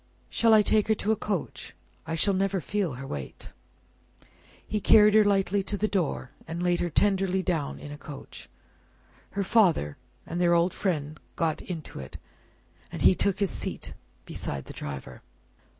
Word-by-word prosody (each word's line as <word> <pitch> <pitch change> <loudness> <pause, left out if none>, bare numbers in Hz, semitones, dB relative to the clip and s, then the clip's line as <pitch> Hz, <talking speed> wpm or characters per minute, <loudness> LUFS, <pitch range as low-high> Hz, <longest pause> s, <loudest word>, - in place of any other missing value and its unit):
"Shall 230 -1 +3
I 215 - +6
take 215 0 +3
her 220 - +3
to 215 - 0
a - - +3
coach? 200 -5 -4 0.3
I 160 - -2
shall 195 +5 +2
never 195 0 +1
feel 185 -1 -1
her 130 +2 -7
weight." 70 - -7 1.1
He 210 -1 -2
carried 210 0 +7
her 215 0 +7
lightly 200 -1 +2
to 200 +2 -3
the 215 - +1
door, 170 -10 -1 0.2
and 165 +2 -4
laid 175 -1 +2
her 175 - 0
tenderly 190 +1 +2
down 165 -7 -1
in 145 - -9
a 145 - -8
coach. 145 -2 -10 0.8
Her 200 0 0
father 180 - +3 0.3
and 170 +2 -3
their 175 -1 +4
old 170 +1 +2
friend 155 -5 -2 0.2
got 165 -2 0
into 165 -5 -7
it, 65 0 -8 0.7
and - - -4
he - - +7
took 195 +1 0
his 200 - +2
seat - - -4 0.3
beside 70 -1 -5
the - - -9
driver. 70 -3 -7
180 Hz, 170 wpm, -27 LUFS, 155-200 Hz, 1.1 s, carried